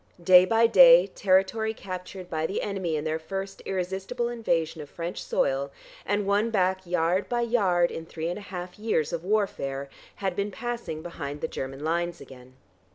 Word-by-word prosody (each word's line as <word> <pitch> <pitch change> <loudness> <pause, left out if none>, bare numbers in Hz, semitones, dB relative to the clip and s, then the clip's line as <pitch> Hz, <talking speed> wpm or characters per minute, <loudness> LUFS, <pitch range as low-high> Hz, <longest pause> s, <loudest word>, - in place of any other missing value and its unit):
Day 180 +1 +8
by 225 +3 +4
day - - +8
territory 200 +4 +1
captured 185 -1 -7
by 160 -2 -1
the 195 - -3
enemy 190 -5 -2
in 150 - -2
their 160 0 -1
first 195 +4 -6
irresistible 195 +6 -2
invasion 165 -9 -1
of 145 - -10
French 170 +1 -5
soil, 135 +1 0 0.4
and 205 0 0
won 205 +3 +2
back 190 -3 0
yard 175 +2 +1
by 240 -1 0
yard 195 -8 +2
in 165 0 -7
three 160 0 -4
and 175 +4 -3
a 200 - -12
half 180 +1 -7
years 210 -9 0
of 170 -1 -3
warfare, 140 -9 -1 0.3
had 190 -3 -2
been 200 +2 -1
passing 230 -8 -5
behind 145 -4 -6
the - - -1
German 135 +2 -6
lines 170 +2 -1
again. 130 -1 -14
185 Hz, 175 wpm, -27 LUFS, 165-205 Hz, 0.4 s, Day